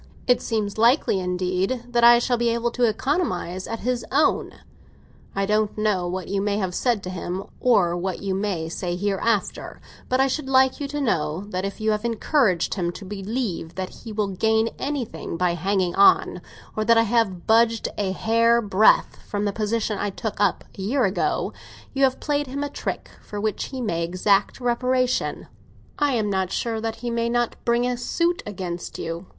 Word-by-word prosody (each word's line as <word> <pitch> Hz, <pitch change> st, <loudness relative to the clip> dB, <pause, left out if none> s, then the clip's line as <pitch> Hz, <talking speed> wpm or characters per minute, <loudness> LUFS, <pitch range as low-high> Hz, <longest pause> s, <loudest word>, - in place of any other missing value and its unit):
It 250 Hz, -, +3 dB
seems 215 Hz, -2 st, -2 dB
likely, 235 Hz, -3 st, +4 dB
indeed, 185 Hz, +6 st, -1 dB
that 240 Hz, -1 st, +1 dB
I 240 Hz, 0 st, +9 dB
shall 245 Hz, +1 st, +1 dB
be 235 Hz, 0 st, +1 dB
able 235 Hz, +1 st, 0 dB
to 245 Hz, 0 st, +2 dB
economise 215 Hz, -, -1 dB
at 230 Hz, -, -5 dB
his 245 Hz, 0 st, -1 dB
own. 295 Hz, +3 st, +2 dB, 0.8 s
I 195 Hz, 0 st, +1 dB
don't 210 Hz, +1 st, 0 dB
know 210 Hz, -4 st, +1 dB
what 185 Hz, 0 st, -4 dB
you 195 Hz, 0 st, -1 dB
may 205 Hz, 0 st, 0 dB
have 190 Hz, -3 st, -2 dB
said 235 Hz, 0 st, 0 dB
to 185 Hz, -, -5 dB
him, 185 Hz, +1 st, -4 dB, 0.2 s
or 190 Hz, -9 st, +3 dB
what 180 Hz, +1 st, -3 dB
you 195 Hz, -1 st, -2 dB
may 190 Hz, -4 st, -2 dB
say 175 Hz, +1 st, -3 dB
hereafter; 205 Hz, +2 st, -1 dB, 0.3 s
but 255 Hz, -, +2 dB
I 270 Hz, -, +5 dB
should 270 Hz, +1 st, -2 dB
like 265 Hz, 0 st, +4 dB
you 285 Hz, -, -3 dB
to 295 Hz, +1 st, -4 dB
know 165 Hz, -, 0 dB
that 185 Hz, -1 st, -2 dB
if 200 Hz, +2 st, -5 dB
you 220 Hz, 0 st, +1 dB
have 210 Hz, 0 st, -1 dB
encouraged 230 Hz, -, +1 dB
him 175 Hz, -3 st, -1 dB
to 200 Hz, -, -9 dB
believe 200 Hz, -3 st, -4 dB
that 185 Hz, -1 st, -3 dB
he 225 Hz, -, -8 dB
will 210 Hz, -1 st, -1 dB
gain 220 Hz, +4 st, +1 dB
anything 270 Hz, -, -4 dB
by 180 Hz, 0 st, +1 dB
hanging 185 Hz, +1 st, 0 dB
on, 200 Hz, -, +4 dB, 0.3 s
or 215 Hz, -, 0 dB
that 230 Hz, +1 st, +4 dB
I 225 Hz, -, +6 dB
have 220 Hz, -6 st, 0 dB
budged 225 Hz, 0 st, +3 dB
a 200 Hz, -2 st, -1 dB
hair's 230 Hz, +2 st, +2 dB
breadth 200 Hz, +2 st, +4 dB
from 205 Hz, 0 st, -2 dB
the 205 Hz, -, -1 dB
position 215 Hz, -1 st, -1 dB
I 205 Hz, -, -1 dB
took 205 Hz, +1 st, -5 dB
up 200 Hz, -3 st, +2 dB, 0.2 s
a -, -, -3 dB
year 240 Hz, +5 st, +1 dB
ago, 190 Hz, +1 st, -1 dB, 0.4 s
you 275 Hz, 0 st, +4 dB
have 260 Hz, -1 st, 0 dB
played 290 Hz, -1 st, -1 dB
him 280 Hz, +3 st, -3 dB
a 290 Hz, -, -3 dB
trick -, -, -5 dB
for 205 Hz, -, -7 dB
which 215 Hz, 0 st, -1 dB
he 260 Hz, -2 st, -6 dB
may 170 Hz, -8 st, -1 dB
exact 195 Hz, +6 st, +1 dB
reparation. 255 Hz, +1 st, 0 dB, 0.5 s
I'm 240 Hz, -8 st, +1 dB
not 190 Hz, -1 st, -1 dB
sure 225 Hz, -2 st, -2 dB
that 225 Hz, 0 st, -2 dB
he 240 Hz, 0 st, -4 dB
may 235 Hz, 0 st, 0 dB
not 240 Hz, 0 st, 0 dB
bring 235 Hz, +1 st, +2 dB
a 250 Hz, 0 st, -1 dB
suit 340 Hz, +8 st, 0 dB
against 180 Hz, -4 st, -5 dB
you. 165 Hz, +3 st, -5 dB
215 Hz, 190 wpm, -24 LUFS, 190-240 Hz, 0.8 s, I